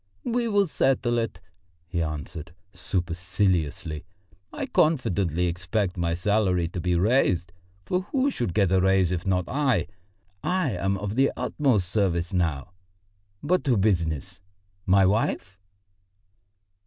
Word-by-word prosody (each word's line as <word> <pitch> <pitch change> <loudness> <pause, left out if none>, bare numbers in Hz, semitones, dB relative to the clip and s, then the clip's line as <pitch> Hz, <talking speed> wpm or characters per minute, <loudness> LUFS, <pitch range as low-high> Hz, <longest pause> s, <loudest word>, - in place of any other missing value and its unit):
"We 240 0 0
will 205 -2 +3
settle 125 -6 +1
it," 115 -1 -3 0.5
he 85 0 -2
answered 75 +1 -5 0.2
superciliously. 90 -3 -1 0.5
"I - - -4
confidently 100 - +1
expect 90 +2 -1
my 85 -1 -1
salary 90 -2 +1
to 90 - -5
be 90 0 +1
raised, 90 -4 +2 0.3
for 180 - 0
who 275 0 +2
should 105 - -3
get 100 -4 +3
a 95 -1 +4
raise 95 -2 +3
if 90 +2 -3
not 90 -2 +1
I? 130 - +1 0.6
I 180 -7 +1
am 95 +1 -1
of 105 +1 -4
the 135 +2 +3
utmost 125 - +1
service 90 -2 0
now. 80 -4 -1 0.7
But 180 +5 +1
to 125 -5 +3
business. 85 -8 0 0.5
My 95 +1 +5
wife?" 95 -1 0
95 Hz, 130 wpm, -25 LUFS, 85-120 Hz, 0.7 s, My